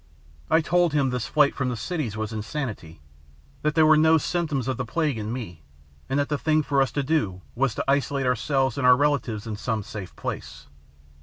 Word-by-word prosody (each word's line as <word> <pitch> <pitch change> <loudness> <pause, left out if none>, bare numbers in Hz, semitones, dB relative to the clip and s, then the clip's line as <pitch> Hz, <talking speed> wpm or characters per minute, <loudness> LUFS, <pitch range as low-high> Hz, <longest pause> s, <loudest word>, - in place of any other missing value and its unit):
I 160 +1 +4
told 175 0 +2
him 140 -3 +2
this 125 -2 -2
flight 150 -2 +3
from 130 -2 -2
the 120 - -3
cities 130 - -3
was 110 +1 -3
insanity, 110 - -5 0.6
that 150 -1 0
there 160 - +5
were 155 0 +7
no 160 +1 +5
symptoms 155 -5 -1
of 130 -3 -1
the 125 - -2
plague 145 0 -1
in 105 +1 -4
me, 105 -10 -6 0.5
and 135 - 0
that 145 - +1
the 145 -2 -2
thing 155 -1 +2
for 140 -1 +1
us 135 - +1
to 145 - 0
do 105 - -1
was 130 -2 0
to - - -2
isolate 140 0 +1
ourselves 130 +1 0
and 125 - +2
our 125 0 +7
relatives 140 -7 0
in 110 -2 -5
some 110 -1 -2
safe 100 -2 -8
place. - - -6
135 Hz, 210 wpm, -25 LUFS, 110-150 Hz, 0.6 s, were